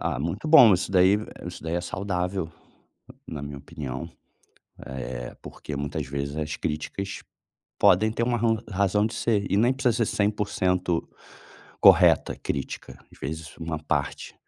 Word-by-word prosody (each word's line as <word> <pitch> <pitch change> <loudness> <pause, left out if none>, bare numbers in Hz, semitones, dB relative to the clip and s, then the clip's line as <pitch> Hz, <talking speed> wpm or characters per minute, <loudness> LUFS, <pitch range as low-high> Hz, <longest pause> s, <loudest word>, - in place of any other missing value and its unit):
Ah, - - -1
muito 85 - -3
bom, 125 -9 +9
isso 90 - -2
daí 95 +2 +5 0.3
isso - - -8
daí 80 +1 -3
é 85 - 0
saudável, 90 -1 -3 0.8
na 75 -3 -6
minha 70 -1 -6
opinião. 70 +2 -6 0.8
Eh, 60 -2 -6
porque 75 - -8
muitas 70 +1 -3
vezes 70 +1 -4
as 75 0 -2
críticas 95 +6 -4 0.6
podem 110 +5 +5
ter 115 - -2
uma 120 0 +1
ron 115 0 +2
razão 100 +1 +2
de - - -5
ser 105 -4 0
e 100 - +2
nem 120 +4 +4
precisa 120 -3 +1
ser - - -4
100% 95 -4 0 0.7
correta, - - +6
a - - -18
crítica. 70 -2 -5
Às - - -17
vezes 80 +3 -6
uma 80 -1 -3
parte, - - -2
90 Hz, 155 wpm, -26 LUFS, 75-105 Hz, 0.8 s, bom